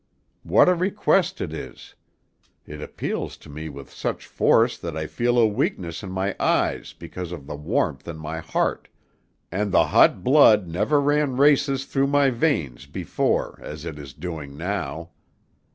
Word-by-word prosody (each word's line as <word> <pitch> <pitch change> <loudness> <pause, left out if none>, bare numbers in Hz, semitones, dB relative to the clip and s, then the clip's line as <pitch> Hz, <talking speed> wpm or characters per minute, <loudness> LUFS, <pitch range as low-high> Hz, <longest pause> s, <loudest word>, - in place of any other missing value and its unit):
What - - +4
a 180 - +6
request 185 0 +1
it 80 - -4
is! - - -9 0.7
It 75 0 -9
appeals - - -4
to - - -14
me 80 +2 -6
with 70 -2 -10
such - - -4
force - - +3
that 85 -2 -5
I 80 - -2
feel 120 +8 0
a 120 - +6
weakness 90 -5 -2
in 95 - -7
my 95 +1 -2
eyes - - +1
because 85 +1 -8
of 80 -6 -7
the 75 - -6
warmth 75 +1 -1
in 85 -2 -6
my 80 +1 -5
heart, - - -1 0.6
and 100 +3 -1
the - - +5
hot 90 - +4
blood 110 - +6
never 105 - +1
ran 145 -2 +1
races 140 -1 +3
through 135 0 +1
my 140 -1 +3
veins 85 - -1
before 70 - -1
as 75 +1 -8
it 80 -3 -6
is 70 -3 -10
doing 75 -4 -7
now. 85 -2 -4
90 Hz, 165 wpm, -24 LUFS, -, 0.7 s, a